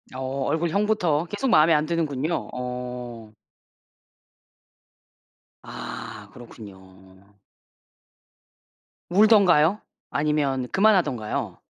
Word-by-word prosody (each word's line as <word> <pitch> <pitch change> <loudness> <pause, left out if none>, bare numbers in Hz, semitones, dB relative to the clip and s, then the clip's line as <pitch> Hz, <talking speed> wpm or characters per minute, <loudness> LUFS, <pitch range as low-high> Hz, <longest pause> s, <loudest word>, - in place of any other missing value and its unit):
어 130 +1 -3
얼굴형부터 170 -1 0
계속 205 +8 -3
마음에 160 -3 +5
안 150 0 +2
드는군요. 160 -1 -2
어. 125 -3 -6 2.3
아 - - -8
그렇군요. 95 -3 -15 1.7
울던가요? 200 -3 +4 0.3
아니면 145 -4 -1
그만하던가요? 175 - +1
150 Hz, 180 characters per minute, -24 LUFS, 125-170 Hz, 2.3 s, 마음에